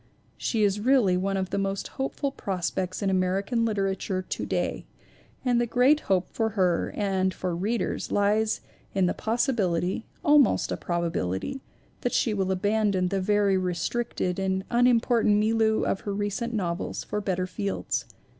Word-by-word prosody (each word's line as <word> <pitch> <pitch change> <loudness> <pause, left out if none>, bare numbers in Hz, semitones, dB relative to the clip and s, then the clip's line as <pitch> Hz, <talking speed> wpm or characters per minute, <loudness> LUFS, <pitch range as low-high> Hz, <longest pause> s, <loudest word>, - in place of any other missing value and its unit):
She 225 -3 0
is 205 0 +2
really 230 -5 +3
one 195 +2 0
of 190 -1 -2
the - - 0
most 195 0 -2
hopeful 270 +1 -3
pros 185 -9 -3
pects 185 +2 -3
in 195 - +1
American 195 +5 +1
literature 195 -3 -1
to - - -4
day - - -2 0.6
and 245 -1 +3
the 240 - 0
great 255 +6 +4
hope 185 -2 +2
for 225 -1 0
her 180 -3 +2
and 190 -2 +1
for 180 -2 -3
readers 215 +7 -2
lies 210 +2 +2 0.3
in 190 -1 +3
the 180 - +1
possibility 220 - 0 0.2
almost 295 -3 +4
a - - 0
probability 170 - -2 0.4
that 245 - -1
she 225 - +2
will 190 -2 0
abandon 200 -1 +1
the 195 0 -1
very 200 -1 +2
re 180 -1 -1
stricted 185 -2 -2
and 190 0 0
unimportant 240 -2 +4
milieu 220 0 +2
of 195 - 0
her 200 -1 -4
recent 205 +4 -2
novels 180 -5 -2
for 210 - -3
better 185 -2 -1
fields. 200 +1 -3
200 Hz, 160 wpm, -26 LUFS, 185-225 Hz, 0.6 s, great